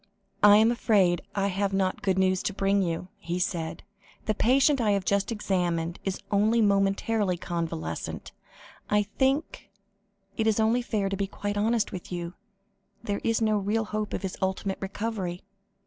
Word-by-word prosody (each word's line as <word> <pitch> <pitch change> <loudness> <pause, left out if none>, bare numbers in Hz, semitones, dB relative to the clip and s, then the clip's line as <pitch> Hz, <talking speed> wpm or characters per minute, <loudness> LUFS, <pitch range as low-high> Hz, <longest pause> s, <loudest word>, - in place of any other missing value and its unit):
"I 205 0 +8
am 220 +2 +5
afraid 200 -7 +2
I 195 -1 +1
have 195 +1 -1
not 190 -1 0
good 190 -1 +1
news 185 0 +2
to 200 - -9
bring 200 0 +2
you," 175 0 -2
he 170 -1 -3
said. 170 -3 -2 0.4
"The 215 - +1
patient 270 +5 +3
I 210 -3 +3
have 195 -2 -1
just 200 +2 +1
examined, 175 -6 -1
is 195 -1 -2
only 215 +3 +3
momentarily 200 -1 +2
convalescent. 165 - -4 0.6
I 210 0 +3
think 265 +8 -1 0.7
it 220 - +1
is 220 0 +2
only 225 +3 +3
fair 215 -4 -1
to 195 - -2
be 195 0 -2
quite 205 +1 -4
honest 220 +2 +1
with 180 - -8
you: 175 -1 -4 0.7
there 205 -3 -2
is 225 0 +1
no 215 -1 +2
real 215 +3 0
hope 215 0 -3
of - - -5
his 190 - -4
ultimate 190 +1 -1
recovery." 195 -3 -4
200 Hz, 165 wpm, -27 LUFS, 185-220 Hz, 0.7 s, I